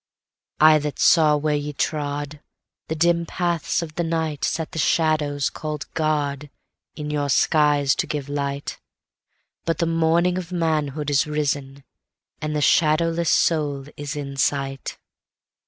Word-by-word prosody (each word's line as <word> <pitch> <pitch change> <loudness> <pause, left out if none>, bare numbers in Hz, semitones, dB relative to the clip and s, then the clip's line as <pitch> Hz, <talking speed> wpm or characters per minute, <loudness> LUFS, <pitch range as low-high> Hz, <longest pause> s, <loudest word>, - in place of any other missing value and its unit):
I 155 0 +7
that 150 -1 -4
saw 155 -3 +5
where 150 +1 0
ye 145 0 -2
trodThe 145 0 -3 0.6
dim 170 +1 +2
paths 170 -1 -1
of 155 -2 -8
the 170 - -2
nightSet 160 0 -2
the 165 - -5
shadow 155 -2 +1 0.2
call'd 150 -1 -5
GodIn 150 -2 -1 0.5
your 150 -1 -2
skies 145 -1 +3
to - - -1
give 145 -2 -4
light; 140 0 -4 0.8
But 165 - -1
the 170 - +1
morning 165 +2 +2
of 180 -1 -8
manhood 155 -4 -1
is 145 +2 +2
risen, 140 -2 -2 0.6
and 150 0 -2
the 150 - 0
shadowless 165 +2 +2
soul 145 -4 +1
is 145 0 -5
in 140 -2 -6
sight. 135 -1 -1
150 Hz, 130 wpm, -23 LUFS, 145-160 Hz, 0.8 s, I